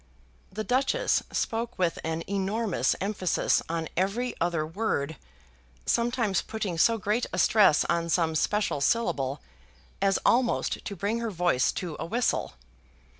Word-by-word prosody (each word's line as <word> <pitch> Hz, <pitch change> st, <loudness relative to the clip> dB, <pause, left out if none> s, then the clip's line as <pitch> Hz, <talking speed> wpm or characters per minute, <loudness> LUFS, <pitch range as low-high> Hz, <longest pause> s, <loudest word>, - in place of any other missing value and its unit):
The 215 Hz, +3 st, -4 dB
Duchess 255 Hz, +4 st, +1 dB
spoke 230 Hz, +1 st, -2 dB
with 175 Hz, -3 st, 0 dB
an 160 Hz, +1 st, -2 dB
enormous 195 Hz, -, 0 dB
emphasis 195 Hz, -3 st, +1 dB
on 165 Hz, -1 st, -2 dB
every 205 Hz, +8 st, 0 dB
other 165 Hz, -2 st, +1 dB
word, 160 Hz, -4 st, -2 dB, 0.7 s
sometimes 235 Hz, -5 st, +1 dB
putting 200 Hz, -6 st, -4 dB
so 230 Hz, +6 st, +4 dB
great 210 Hz, +4 st, 0 dB
a -, -, -3 dB
stress 200 Hz, -5 st, +5 dB
on 170 Hz, 0 st, 0 dB
some 165 Hz, -1 st, +2 dB
special 205 Hz, -1 st, 0 dB
syllable, 145 Hz, -, 0 dB, 0.6 s
as 195 Hz, 0 st, +3 dB
almost 240 Hz, 0 st, +2 dB
to 200 Hz, -, -4 dB
bring 200 Hz, +5 st, -1 dB
her 230 Hz, -1 st, -2 dB
voice 175 Hz, -9 st, +2 dB
to 175 Hz, -4 st, -4 dB
a -, -, -3 dB
whistle. 235 Hz, -, 0 dB
195 Hz, 135 wpm, -27 LUFS, 165-225 Hz, 0.7 s, stress